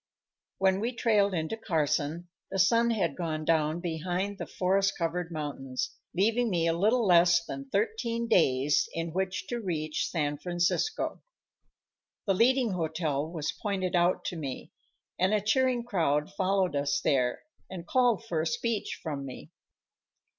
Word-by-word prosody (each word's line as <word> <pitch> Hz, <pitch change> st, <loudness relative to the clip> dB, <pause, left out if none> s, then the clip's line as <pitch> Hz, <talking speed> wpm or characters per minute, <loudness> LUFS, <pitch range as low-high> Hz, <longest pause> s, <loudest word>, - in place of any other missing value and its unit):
When 190 Hz, 0 st, +2 dB
we 235 Hz, +4 st, -2 dB
trailed 205 Hz, -5 st, +2 dB
into 160 Hz, +6 st, -2 dB
Carson, 160 Hz, -4 st, -1 dB, 0.2 s
the 195 Hz, -, -3 dB
sun 230 Hz, +5 st, +4 dB
had 185 Hz, -11 st, 0 dB
gone 155 Hz, -3 st, -3 dB
down 160 Hz, +1 st, +1 dB
behind 180 Hz, +4 st, -2 dB
the -, -, -5 dB
forest 195 Hz, +1 st, +1 dB
covered 170 Hz, 0 st, -2 dB
mountains, 140 Hz, -4 st, -4 dB, 0.2 s
leaving 225 Hz, +5 st, +2 dB
me 170 Hz, -4 st, +1 dB
a 165 Hz, -, +2 dB
little 215 Hz, +7 st, +2 dB
less 170 Hz, -2 st, +5 dB
than 275 Hz, 0 st, -7 dB
thirteen 235 Hz, -, -1 dB
days 140 Hz, -, +3 dB
in 165 Hz, -1 st, -3 dB
which 185 Hz, 0 st, -2 dB
to 240 Hz, -, -2 dB
reach 155 Hz, -7 st, -2 dB
San 145 Hz, -3 st, -1 dB
Francisco. 175 Hz, -, -1 dB, 1.0 s
The 195 Hz, -, +2 dB
leading 245 Hz, +3 st, +3 dB
hotel 160 Hz, -3 st, -2 dB
was 155 Hz, -3 st, -2 dB
pointed 190 Hz, -3 st, -1 dB
out 175 Hz, +1 st, +2 dB
to -, -, -3 dB
me, 140 Hz, -6 st, -6 dB, 0.5 s
and 185 Hz, +4 st, +3 dB
a -, -, +3 dB
cheering 245 Hz, +3 st, +1 dB
crowd 165 Hz, -7 st, 0 dB
followed 190 Hz, -3 st, +1 dB
us 140 Hz, 0 st, +1 dB
there 125 Hz, -3 st, +1 dB, 0.3 s
and 175 Hz, -3 st, -7 dB
called 240 Hz, -1 st, +2 dB
for 165 Hz, -7 st, -1 dB
a 160 Hz, -, -1 dB
speech 225 Hz, +6 st, -2 dB
from 145 Hz, -4 st, -4 dB
me. 130 Hz, -2 st, -9 dB
180 Hz, 150 wpm, -29 LUFS, 155-210 Hz, 1.0 s, less